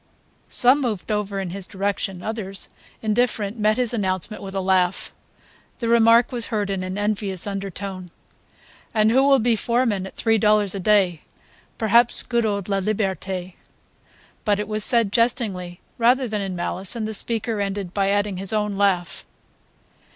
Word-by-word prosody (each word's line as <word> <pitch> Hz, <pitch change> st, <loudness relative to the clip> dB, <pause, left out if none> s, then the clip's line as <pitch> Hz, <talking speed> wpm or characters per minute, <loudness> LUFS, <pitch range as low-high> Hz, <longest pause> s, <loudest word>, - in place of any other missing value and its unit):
Some 255 Hz, +4 st, +4 dB
moved 220 Hz, -5 st, -2 dB
over 205 Hz, -1 st, -1 dB
in 190 Hz, -3 st, -4 dB
his 190 Hz, 0 st, -6 dB
direction; 195 Hz, -2 st, -3 dB
others, 200 Hz, -3 st, -4 dB, 0.3 s
indifferent, 215 Hz, -1 st, 0 dB
met 215 Hz, +1 st, +2 dB
his 245 Hz, -2 st, 0 dB
announcement 190 Hz, -1 st, -2 dB
with 195 Hz, 0 st, -7 dB
a -, -, 0 dB
laugh. 185 Hz, -1 st, +1 dB, 0.6 s
The 235 Hz, -, -3 dB
remark 230 Hz, +1 st, +5 dB
was 240 Hz, -2 st, -1 dB
heard 205 Hz, -3 st, -1 dB
in 195 Hz, -1 st, -2 dB
an 185 Hz, +1 st, -4 dB
envious 205 Hz, -3 st, -2 dB
undertone: 195 Hz, -2 st, -5 dB, 0.9 s
"And 215 Hz, 0 st, +4 dB
who 260 Hz, +3 st, +5 dB
will 275 Hz, 0 st, +5 dB
be 235 Hz, -1 st, +2 dB
foreman 225 Hz, -4 st, 0 dB
at -, -, -13 dB
three 225 Hz, -1 st, +2 dB
dollars 210 Hz, -1 st, +3 dB
a 200 Hz, -, -4 dB
day? 185 Hz, -4 st, +3 dB, 0.6 s
Perhaps 230 Hz, +2 st, +3 dB
good 235 Hz, -2 st, 0 dB
old 200 Hz, -3 st, -2 dB
Laliberte 195 Hz, -2 st, -2 dB, 0.4 s
..." -, -, -32 dB
But 205 Hz, -2 st, +1 dB
it 210 Hz, -, -3 dB
was 215 Hz, 0 st, 0 dB
said 230 Hz, -5 st, +2 dB
jestingly 200 Hz, -7 st, 0 dB, 0.2 s
rather 250 Hz, +2 st, +3 dB
than 210 Hz, -2 st, -2 dB
in 190 Hz, -2 st, -3 dB
malice, 180 Hz, +4 st, -4 dB
and 220 Hz, -2 st, -2 dB
the 220 Hz, -, -4 dB
speaker 225 Hz, 0 st, -1 dB
ended 195 Hz, -2 st, -3 dB
by 195 Hz, -1 st, +1 dB
adding 205 Hz, -1 st, 0 dB
his 195 Hz, 0 st, -2 dB
own 210 Hz, -2 st, -1 dB
laugh. 185 Hz, -4 st, +1 dB
205 Hz, 165 wpm, -23 LUFS, 195-225 Hz, 0.9 s, remark